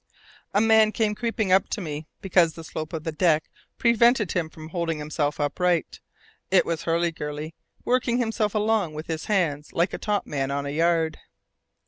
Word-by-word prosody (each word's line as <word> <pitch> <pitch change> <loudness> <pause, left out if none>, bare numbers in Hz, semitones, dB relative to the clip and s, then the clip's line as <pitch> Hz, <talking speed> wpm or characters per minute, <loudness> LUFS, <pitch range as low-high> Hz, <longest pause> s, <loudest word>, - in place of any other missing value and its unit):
A 205 - +5
man 220 -1 +5
came 215 -2 0
creeping 220 -3 -1
up 190 +1 +4
to - - -2
me, 155 -4 -5
because 175 -4 +3
the 165 - -9
slope 155 -1 -6
of 160 -2 -5
the 160 - -2
deck 155 -1 +1 0.3
prevented 235 -3 +4
him 170 -3 -1
from 155 0 -11
holding 165 -2 -2
himself 150 0 -2
upright: 170 +3 0 0.5
it 190 -1 +4
was 165 -1 -3
Hurliguerly, 160 -2 -2 0.3
working 245 -1 +1
himself 220 -3 0
along 210 -6 +1
with 155 +1 -5
his 160 -1 -4
hands 160 -8 0
like 170 +3 +1
a - - -4
top 210 -2 -1
man 135 -2 -2
on 140 0 -2
a 140 - -3
yard. 165 +1 +1
170 Hz, 175 wpm, -25 LUFS, 155-210 Hz, 0.5 s, A